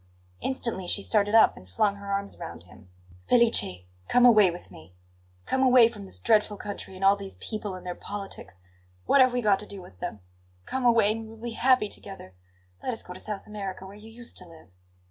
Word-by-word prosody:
Instantly 235 -8 -2
she 200 - -1
started 205 0 +2
up 225 - +6
and 90 - -15
flung 200 - +1
her 200 0 -7
arms 200 0 -3
round 165 - -8
him. 90 +2 -18 0.4
"Felice, 225 - +4 0.2
come 245 0 +5
away 215 -6 +7
with 175 +1 -9
me! 85 +3 -15 0.5
Come 265 - 0
away 250 -3 +6
from 210 -4 -10
this 190 - -7
dreadful 210 -2 +2
country 205 -2 -7
and 190 +1 -2
all 195 +1 +6
these 200 -1 -8
people 210 -3 -5
and 185 - -11
their 180 - -3
politics! 200 - -7 0.5
What 280 - +5
have 255 -1 +5
we 245 0 -1
got 200 -2 +3
to 210 - -7
do 200 - -8
with 95 - -14
them? 105 - -6 0.4
Come 260 -1 -3
away, 230 -3 +5
and 225 +1 -3
we 220 - -9
will 225 - -12
be 240 - -3
happy 250 -1 +3
together. 195 - -9 0.5
Let 255 - -2
us 225 - -6
go 180 - -9
to 185 - -10
South 210 0 -5
America, 195 -3 -6
where 190 - -11
you 215 +2 -13
used 235 +1 -9
to 180 - -5
live." 165 - -16
205 Hz, 220 wpm, -27 LUFS, 185-225 Hz, 0.5 s, away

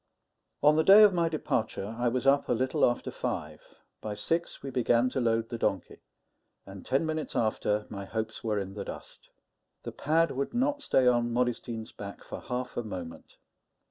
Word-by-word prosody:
On 150 +1 +6
the 160 - +4
day 200 +4 +9
of 205 -2 +6
my 170 -2 +1
departure 110 -8 -2
I 120 +1 0
was 125 +2 -1
up 140 +1 +3
a - - +3
little 130 +2 0
after 120 - +1
five; - - -4 0.4
by 105 -1 -4
six, 165 +12 -2
we 135 - -5
began 125 0 +2
to 130 - -1
load 115 -1 +1
the 115 - -5
donkey; 100 -5 -2 0.7
and 95 -1 -10
ten 135 +5 +1
minutes 155 -3 -3
after 105 -1 0
my 100 -2 -7
hopes 110 +2 -4
were 110 -2 0
in 95 -1 -4
the 100 -1 -5
dust. - - -10 0.5
The - - -5
pad 160 +2 +1
would 140 - -3
not 285 +4 +1
stay 135 - +2
on 120 -1 +3
Modestine's 120 -2 -2
back 100 -1 -9
for - - -7
half 125 0 -4
a - - +1
moment. 90 -6 -8
120 Hz, 185 wpm, -29 LUFS, 110-140 Hz, 0.7 s, day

